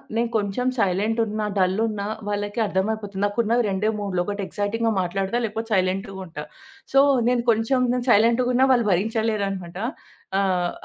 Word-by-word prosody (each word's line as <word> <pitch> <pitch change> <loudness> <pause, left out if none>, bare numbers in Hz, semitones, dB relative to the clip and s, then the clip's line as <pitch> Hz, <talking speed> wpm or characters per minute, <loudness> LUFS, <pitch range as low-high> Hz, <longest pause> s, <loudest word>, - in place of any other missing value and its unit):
నేను 235 0 +1
కొంచెం 205 +5 -1
సైలెంటున్నా, 215 +2 0
డల్లున్న 200 +3 +1 0.3
వాళ్లకి 205 +2 -3
అర్థం 190 +1 0
అయిపోతుంది. 205 -2 -5
నాకు 205 +2 -3
ఉన్నవి 235 +3 +2
రెండే 200 +2 0
మూడ్లు, 190 -3 -1
ఒకటి 205 0 -3
ఎక్సైటింగ్‌గా 225 +3 -1
మాట్లాడతా, 195 +5 -1
లేకపోతే 225 +1 -5
సైలెంట్‌గా 190 +2 -1
ఉంటా. 160 -3 -7 0.5
సో, 270 - +6 0.3
నేను 245 -1 +1
కొంచెం 225 +4 +1 0.3
సైలెంట్‌గున్న 245 +4 +4
వాళ్లు 235 -4 +2
భరించలేరన్నమాట. 200 -3 -1 0.6
ఆహ్, 180 -3 +1
205 Hz, 135 wpm, -23 LUFS, 195-225 Hz, 0.6 s, సో